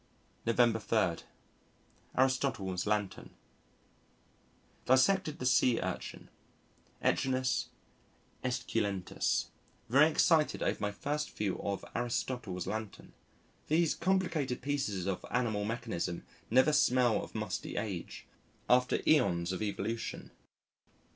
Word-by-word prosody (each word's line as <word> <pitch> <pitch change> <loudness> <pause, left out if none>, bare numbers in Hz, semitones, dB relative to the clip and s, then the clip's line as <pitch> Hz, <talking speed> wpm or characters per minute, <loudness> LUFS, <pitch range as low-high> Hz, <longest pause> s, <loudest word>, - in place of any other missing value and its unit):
November 115 -1 +4
3. 110 -7 +1 1.0
Aristotle's 130 -9 +1
Lantern 105 -2 -2 1.5
Dissected 155 +6 +3
the 125 - -5
Sea 125 -2 +4
Urchin - - -5 0.7
(Echinus 130 -1 +1 0.8
esculentus). 115 -7 -1 0.4
Very 145 +6 +6
excited 160 -1 +3
over - - 0
my 105 0 0
first 150 +8 -3
view 100 -3 -1
of 100 -1 -3
Aristotle's 115 -5 -2
Lantern. 110 -2 -6 0.5
These 160 +1 +3
complicated 170 -9 0
pieces 130 -10 -1
of 95 -2 -2
animal 110 -4 0
mechanism 110 -6 -3 0.3
never 130 +6 +5
smell 125 -5 +3
of - - -11
musty - - -4
age 100 -5 -4 0.4
after 125 0 +4
æons 90 - +3
of 95 - -4
evolution. 110 +2 -3
120 Hz, 95 wpm, -32 LUFS, 105-135 Hz, 1.5 s, Very